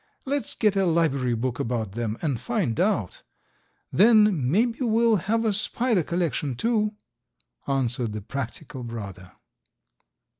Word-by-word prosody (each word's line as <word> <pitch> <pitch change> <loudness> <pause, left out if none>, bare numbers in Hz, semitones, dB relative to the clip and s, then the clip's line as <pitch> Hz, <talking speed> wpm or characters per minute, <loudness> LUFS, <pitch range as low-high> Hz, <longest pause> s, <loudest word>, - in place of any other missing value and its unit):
Let's 280 +1 0
get 210 -3 +2
a 195 -1 +2
library 140 -7 +1
book 125 +2 -3
about 115 -4 -2
them 115 +1 -3
and 140 -7 -1
find 120 +1 -1
out; 175 - 0 0.7
then 210 - +5
may 205 - +4
be 235 +1 -5
we'll 230 -1 +3
have 225 +6 0
a 215 - +2
spider 220 0 +1
collection, 155 -5 -2
too," 215 - 0 0.7
answered 125 -4 0
the 105 - -5
practical 135 +3 -6
brother. 100 -6 -8
155 Hz, 135 wpm, -25 LUFS, -, 0.7 s, then